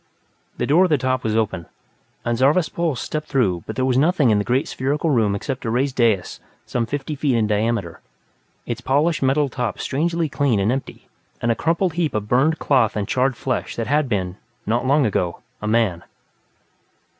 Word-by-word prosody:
The -, -, -1 dB
door 170 Hz, +6 st, +4 dB
at -, -, -1 dB
the 150 Hz, -, +3 dB
top 130 Hz, 0 st, -1 dB
was 110 Hz, 0 st, 0 dB
open, 105 Hz, -6 st, -1 dB, 0.6 s
and 120 Hz, 0 st, +1 dB
Zarvas 145 Hz, +7 st, +3 dB
Pol 170 Hz, -4 st, -1 dB
stepped 155 Hz, +5 st, -4 dB
through 100 Hz, -, +1 dB
but -, -, -5 dB
there 130 Hz, -, 0 dB
was 130 Hz, -1 st, +2 dB
nothing 150 Hz, -5 st, +3 dB
in 105 Hz, -, +3 dB
the -, -, 0 dB
great 125 Hz, +5 st, 0 dB
spherical 145 Hz, +4 st, -1 dB
room 110 Hz, -6 st, +2 dB
except 130 Hz, +6 st, -4 dB
a 115 Hz, -, -2 dB
raised 130 Hz, +3 st, 0 dB
dais 110 Hz, -7 st, +1 dB, 0.3 s
some 115 Hz, -2 st, -2 dB
fifty 145 Hz, +3 st, -3 dB
feet 140 Hz, -3 st, 0 dB
in 115 Hz, -2 st, +2 dB
diameter, 105 Hz, -4 st, -1 dB, 0.6 s
its -, -, -4 dB
polished 150 Hz, +5 st, +1 dB
metal 140 Hz, +2 st, +2 dB
top 125 Hz, -4 st, -3 dB
strangely 165 Hz, +3 st, 0 dB
clean 140 Hz, -7 st, +1 dB
and 100 Hz, +4 st, +2 dB
empty. 135 Hz, +1 st, -5 dB, 0.3 s
And 120 Hz, -, +1 dB
a -, -, +1 dB
crumpled 170 Hz, +5 st, 0 dB
heap 165 Hz, -6 st, -1 dB
of 105 Hz, -1 st, -2 dB
burned 140 Hz, +8 st, +2 dB
cloth 130 Hz, -7 st, +2 dB
and 100 Hz, -2 st, -2 dB
charred 130 Hz, +1 st, +1 dB
flesh 130 Hz, -2 st, -3 dB
that 115 Hz, -, -2 dB
had, 145 Hz, -1 st, +1 dB, 0.5 s
not 120 Hz, +4 st, 0 dB
long 140 Hz, +1 st, +4 dB
ago, 90 Hz, -5 st, -1 dB, 0.2 s
been 105 Hz, -, -3 dB
a -, -, +1 dB
man. 105 Hz, -7 st, +1 dB
130 Hz, 195 wpm, -21 LUFS, 110-145 Hz, 0.6 s, door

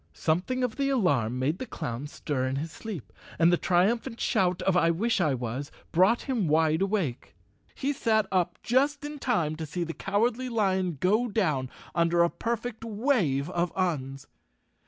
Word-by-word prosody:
Something 180 Hz, +11 st, 0 dB
of 245 Hz, -3 st, -2 dB
the 275 Hz, -1 st, +1 dB
alarm 145 Hz, -, +1 dB
made 145 Hz, +7 st, 0 dB
the 260 Hz, -, -5 dB
clown 120 Hz, -, -5 dB
stir 140 Hz, -3 st, -2 dB
in 130 Hz, -, -2 dB
his 155 Hz, +4 st, -3 dB
sleep, 195 Hz, -, -8 dB, 0.2 s
and 170 Hz, +1 st, +5 dB
the -, -, +7 dB
triumphant 200 Hz, +7 st, +1 dB
shout 180 Hz, -1 st, +1 dB
of 190 Hz, -, +2 dB
I 170 Hz, -2 st, +4 dB
wish 210 Hz, +5 st, +1 dB
I 150 Hz, -5 st, +2 dB
was 125 Hz, +3 st, -4 dB, 0.2 s
brought 190 Hz, +8 st, +4 dB
him 240 Hz, -, -1 dB
wide 160 Hz, +1 st, +3 dB
awake. 195 Hz, -, -1 dB, 0.4 s
He 285 Hz, +1 st, -1 dB
sat 220 Hz, -5 st, +2 dB
up 180 Hz, -2 st, +1 dB
just 280 Hz, +4 st, +1 dB
in 295 Hz, 0 st, -6 dB
time 175 Hz, -, 0 dB
to 160 Hz, -, -4 dB
see 175 Hz, +4 st, -3 dB
the 165 Hz, 0 st, -4 dB
Cowardly 230 Hz, +8 st, 0 dB
Lion 190 Hz, -, 0 dB
go 215 Hz, -, +2 dB
down 155 Hz, -, 0 dB, 0.2 s
under 170 Hz, 0 st, +3 dB
a 170 Hz, -, +2 dB
perfect 230 Hz, 0 st, -3 dB
wave 210 Hz, -, +1 dB
of 175 Hz, -1 st, 0 dB
Uns. 135 Hz, -7 st, -2 dB
180 Hz, 175 wpm, -28 LUFS, 155-230 Hz, 0.4 s, the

